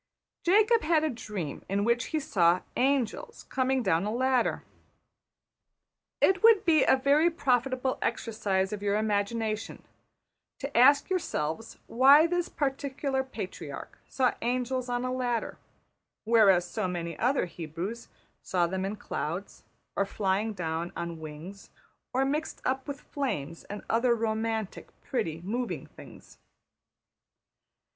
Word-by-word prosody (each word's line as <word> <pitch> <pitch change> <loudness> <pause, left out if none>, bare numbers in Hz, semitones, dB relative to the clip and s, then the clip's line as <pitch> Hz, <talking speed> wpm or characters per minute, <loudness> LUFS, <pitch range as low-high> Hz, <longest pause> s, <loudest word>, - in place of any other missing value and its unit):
Jacob 430 +5 +4
had 315 -1 +2
a 310 - +1
dream 210 - -6
in 200 +1 +1
which 235 +2 +1
he 315 - -1
saw 175 - +2
``angels'' 275 - -1
coming 260 -1 +1
down 175 -4 +2
a 210 - -1
ladder. 255 +1 +1 1.6
It 380 -1 +3
would 450 -2 +6
be 325 -3 +5
a - - +5
very 285 +5 +4
profitable 260 -3 0
exercise 205 -4 -1
of 205 - -5
your 205 0 +1
imagination 215 +1 -1 0.7
to 275 +1 -6
ask 280 +7 +5
yourselves 225 - -2
why 275 +6 +6
this 350 0 -1
particular 270 -1 -2
patriarch 260 - -7
saw 255 -2 +1
angels 250 +1 -1
on 245 0 -1
a 255 - -1
ladder, 245 -2 -2 0.6
whereas 205 -6 +5
so 215 +1 -2
many 170 -2 -4
other 255 0 +2
Hebrews 175 +6 -6 0.3
saw 180 -2 +1
them 190 +2 -2
in 200 +2 -3
clouds, 180 -1 -5 0.3
or 200 - +1
flying 200 +2 0
down 170 -2 -3
on 170 -1 -5
wings, 160 +6 -9 0.4
or 265 +1 +1
mixed 300 +3 -2
up 265 +2 -1
with 285 -1 -6
flames 165 - -4
and 205 - -7
other 235 +1 +2
romantic, 220 -2 -2
pretty, 165 -10 -2
moving 235 +7 -3
things. - - -15
230 Hz, 130 wpm, -28 LUFS, 195-270 Hz, 1.6 s, would